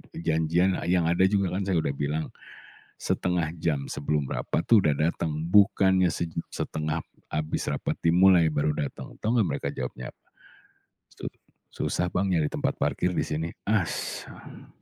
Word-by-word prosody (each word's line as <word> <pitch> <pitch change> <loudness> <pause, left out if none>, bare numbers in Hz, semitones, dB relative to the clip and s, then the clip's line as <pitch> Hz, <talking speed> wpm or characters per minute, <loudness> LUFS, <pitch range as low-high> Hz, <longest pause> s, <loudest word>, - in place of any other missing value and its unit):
i - - -5
janjian 85 +3 +2
yang 90 -2 +3
ada 85 +2 +3
juga 100 -2 +1
kan 100 - -1
saya 90 -4 +2
udah 70 - 0
bilang 75 +2 -1 0.7
0,5 90 -3 0
jam 75 -5 0
sebelum 75 0 -1
rapat - - -1
tuh 110 -4 +7
udah 75 -4 +3
dateng 80 +1 0 0.2
bukannya 95 -3 +5
sej 85 -1 -3 0.2
setengah 75 +1 -3 0.3
habis 75 0 -2
rapat - - -2
dimulai 85 -1 +5
baru 75 +1 +1
datang." 70 -2 -5
Tahu 110 - -2
enggak 105 - +3
mereka - - -2
jawabnya 60 -1 -6
apa? - - -53 1.0
"Su - - -9 0.5
susah, 90 - -1
Bang, 95 +1 0
nyari 80 -4 +2
tempat - - -1
parkir - - 0
di - - +1
sini." 80 +2 -2 0.2
Asem. 105 -5 -3
85 Hz, 155 wpm, -27 LUFS, 75-95 Hz, 1.0 s, tuh